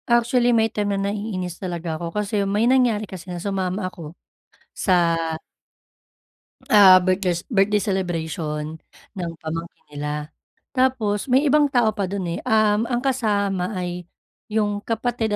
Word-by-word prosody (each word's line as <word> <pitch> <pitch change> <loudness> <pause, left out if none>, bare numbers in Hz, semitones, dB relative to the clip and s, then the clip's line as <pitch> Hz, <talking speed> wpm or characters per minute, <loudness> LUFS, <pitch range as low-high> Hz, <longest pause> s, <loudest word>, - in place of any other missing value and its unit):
Actually, 240 +1 +3
may 230 -2 +4
time 205 -1 -1
na 200 +1 -1
naiinis 185 -5 -4
talaga 175 -3 -4
ako 170 - -3
kasi 210 0 0
may 210 +3 +2
nangyari 240 -4 +3
kasi 185 -2 -10
na 175 - -4
sumama 190 +1 -2
ako, 170 -2 -8 0.5
sa 170 -3 +2 1.5
ah 195 -3 +9
birthdes 180 -2 0
birthday 210 -2 +2
celebration 160 -5 -3 0.4
ng 175 -2 -3
pamangkin 165 +1 -6
nila. 150 +1 -4 0.5
Tapos 255 -6 +1
may 265 +3 +5
ibang 295 +1 +4
tao 240 -4 +3
pa 200 -3 -1
dun 190 -1 -3
eh, 170 - -3
um, 215 0 +3
ang 240 0 -1
kasama 205 -7 0
ay 180 -1 -4 0.5
yung 210 -1 0
kapatid 225 -1 -1
200 Hz, 135 wpm, -22 LUFS, 175-220 Hz, 1.5 s, ah